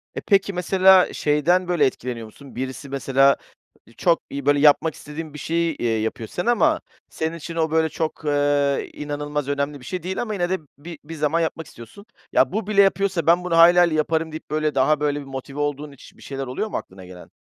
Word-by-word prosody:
E, - - -4
peki, 200 -1 +2
mesela, 185 +1 +4
şeyden, 170 +5 +1
böyle, 175 -5 +2
etkileniyor 125 -3 -3
musun? 135 +5 -14
Birisi 130 +3 -5
mesela 135 0 +3 0.5
i 115 - -20
çok 170 -2 +2
iyi, 140 -1 -6
böyle, 145 0 +3
yapmak 150 +2 +4
istediğin 150 +1 -8
bir 150 - -8
şeyi, 165 0 -1
eee, 120 - -2
yapıyor, 110 0 -4
sen 175 - -4
ama 310 +7 +2 0.3
senin 160 +1 -3
için 165 +1 -8
o, 160 -1 0
böyle, 160 0 +2
çok, 160 0 -4
eee, 145 -1 +1
inanılmaz 145 -1 -4
önemli 140 0 -2
bir 125 - -14
şey 180 +5 -5
değil 185 +1 -3
ama 215 -3 -3
yine 175 -3 -1
de 190 0 0 0.2
bir 160 +2 -10
bir 160 +2 -8
zaman 155 +2 0
yapmak 160 -1 -3
istiyorsun. 120 - -13 0.3
"Ya, 130 - +3
bu 215 -1 -3
bile 205 -2 +4
yapıyorsa 195 -4 +1
ben 175 +2 +4
bunu 175 -2 0
hayli 175 +1 +7
hayli 170 -3 +4
yaparım." 160 +1 0
deyip, 155 - -9
böyle, 155 -1 0
daha, 140 +3 +3
böyle, 145 -1 0
bir 145 - -9
motive 135 +1 -7
olduğun 145 0 -3
hiç 140 - -16
bir - - -18
şeyler 135 -1 -6
oluyor 130 +12 -3
mu - - -3
aklına 95 0 -10
gelen? 90 -1 -13
150 Hz, 215 wpm, -22 LUFS, 140-175 Hz, 0.5 s, hayli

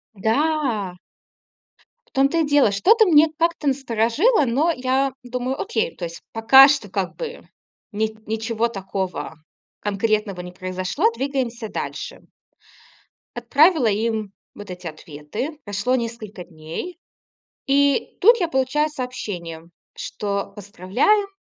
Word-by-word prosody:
Да. 225 - 0 1.1
В - - -31
том 275 -2 +3
то 335 - -1
и 325 - +3
дело, 290 -7 +4
что-то 435 - +5
мне 320 -4 +6
как-то 335 -2 0
насторожило, 270 - +2
но 280 +8 +2
я 260 +1 0
думаю: 250 +2 -3
"Окей, 450 +3 -1
то 175 - -5
есть 170 0 -8
пока 250 +5 +8
что 275 -8 0
как 185 -1 -3
бы 480 -1 -7 0.4
ни 220 +1 -2
ничего 225 +1 -1
такого 190 -5 -4 0.4
конкретного 205 -2 -1
не 180 0 -9
произошло, 185 0 -3
двигаемся 245 -3 -3
дальше". - - -6 1.1
Отправила 310 -3 +4
им 215 -1 -1 0.2
вот 205 -1 -10
эти 180 0 -9
ответы. 155 - -6
Прошло 205 +5 0
несколько 225 -6 -5
дней 165 - -8 0.7
и 280 0 +2
тут 465 +5 +6
я 345 -3 0
получаю 265 +3 +1
сообщение, 205 - -6 0.3
что 200 -1 -4
поздравляю, 205 - +1
235 Hz, 120 wpm, -22 LUFS, 200-290 Hz, 1.1 s, пока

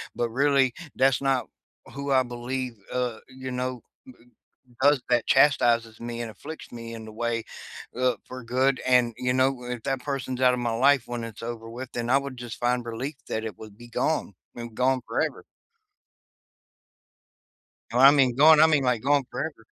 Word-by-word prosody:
but 120 -1 -1
really 135 -1 +3 0.2
that's 135 +1 +3
not 135 -2 +1 0.5
who 140 0 -4
I 130 -1 +4
believe, 125 +1 -4 0.2
uh 125 -3 -2
you 130 0 -7
know, 125 -1 -3 0.3
b 260 - -12 0.7
i 140 - +7
does 145 -2 +3
that 120 -2 +2
chastises 120 -5 +3
me 120 0 -5
and 115 - -5
afflicts 150 +10 -10
me 115 -1 -8
in 110 -1 -8
the 110 - -10
way, 115 -1 -1 0.5
uh, 125 -2 +1
for 130 -1 -9
good, 130 +2 +1
and, 125 -2 +3
you 125 0 0
know, 130 -1 +1
if 120 -2 -5
that 135 -2 -1
person's 130 -2 -3
out 125 0 +6
of 125 - -3
my 120 -1 -1 0.2
life 140 -4 +2
when 120 -1 -4
it's 115 -1 -9
over 115 -1 -6
with, 125 +2 -7
then 120 0 -3
I 135 - +5
would 140 -2 -6
just 120 -2 -7
find 120 0 +1
relief 130 +5 -5
that 110 - -2
it 110 -5 -6
would 110 -1 -12
be 120 0 -12
gone, 115 - -1 0.2
and 120 -2 -7
gone 130 +2 +2
forever. - - -2 2.5
And 125 +2 +2
I 135 - +10
mean, 135 -4 +3
gone 155 +2 +7
I 160 - +8
mean, 150 -3 +2
like, 125 -3 +1
gone 140 0 +3
forever. - - -5
125 Hz, 190 wpm, -26 LUFS, 120-135 Hz, 2.5 s, I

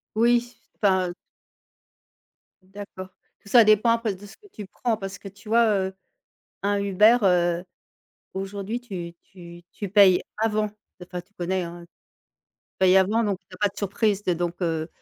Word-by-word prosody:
Oui, 240 +2 +2 0.2
enfin, 195 -3 +3
heu - - -5 1.5
D'accord. 190 -1 -10 0.3
Tout 200 - -16
ça 235 +1 +7
dépend 215 +2 +4
un 230 - +3
peu 220 -4 -2
de 200 +2 -13
ce 205 - -15
que 415 - -20
tu 210 - -8
prends, 230 +4 -2
parce 195 -2 -7
que 200 - -9
tu 200 +2 -16
vois, 230 +1 +4 0.2
heu, 190 - -7 0.7
un 205 +1 0
Uber, 210 +4 +5
heu, 175 -2 +2 0.7
aujourd'hui 200 +4 -4
tu 180 -8 -7
tu 175 -2 -13
tu 205 - -6
payes 195 -2 +6 0.2
avant. 215 -1 0 0.3
Enfin, 180 0 -7
tu 190 +4 -36
connais, 185 0 -2
hein, 170 0 -8
heu - - -14
tu - - -38 0.7
payes 190 0 +5
avant, 210 +5 +2
donc 200 -3 -1
il - - -15
y - - -10
pas 205 +2 +2
de 200 - -24
surprise, 205 0 0
donc 175 -2 -1
heu, 160 -2 -1
195 Hz, 175 wpm, -24 LUFS, 180-215 Hz, 1.5 s, ça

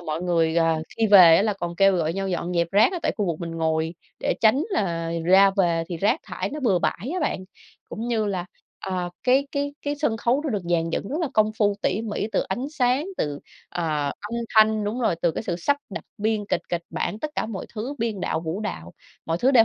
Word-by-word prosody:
mọi 160 -1 -4
người, 165 -2 +1
ờ, 165 -1 +2
khi 225 - +2
về 180 -5 +9
á - - +3
là 210 0 +1
còn 175 -3 -5
kêu 195 0 +5
gọi 165 -1 0
nhau 195 +1 -2
dọn 175 -1 -2
dẹp 170 -1 +1
rác 205 - +4
á 360 - -2
tại - - +1
khu 205 - 0
vực 170 -1 -2
mình 170 -1 -4
ngồi 160 0 -1 0.3
để - - 0
tránh 230 +7 +4
là 170 - -1
ra 190 +3 +6
về 170 -4 +2
thì 175 - -4
rác 215 - +1
thải - - -4
nó 300 +2 -5
bừa 210 -9 +3
bãi 205 +7 -2
á 370 - -1
bạn, 195 - -1 0.4
cũng 230 +2 -5
như 225 -3 +1
là, 185 -3 -2 0.3
ờ, 180 -2 -3
cái 265 +3 +3
cái 285 0 -1
cái 290 0 -1
sân 285 -7 0
khấu 240 +5 +1
nó 310 - -2
được 205 -5 -2
dàn 165 -1 +1
dựng 195 - -3
rất 290 - -3
là 325 - 0
công 215 0 +3
phu 205 -2 +3
tỉ 215 - 0
mỉ, 210 -2 -2
từ - - +2
ánh 240 +7 -3
sáng, 260 +1 +1
từ, 145 -1 -2 0.3
ờ, 155 -4 -1
âm 210 +2 -7 0.2
thanh, 215 -1 +5
đúng 215 +5 -2
rồi, 225 - +2
từ 170 - +3
cái - - -4
sự 175 -6 -2
sắp 285 +11 +1
đặt - - -6
biên 215 0 0
kịch - - +1
kịch 175 -1 -2
bản, 210 - -3
tất 305 +6 -4
cả - - -1
mọi 210 -4 -6
thứ 235 +6 -4
biên 225 -4 -2
đạo, 160 - -1
vũ 165 +4 -4
đạo, 85 - -5 0.3
mọi 165 +1 -1
thứ 255 +8 +3
đều 240 -5 +7
195 Hz, 245 wpm, -24 LUFS, 170-230 Hz, 0.4 s, về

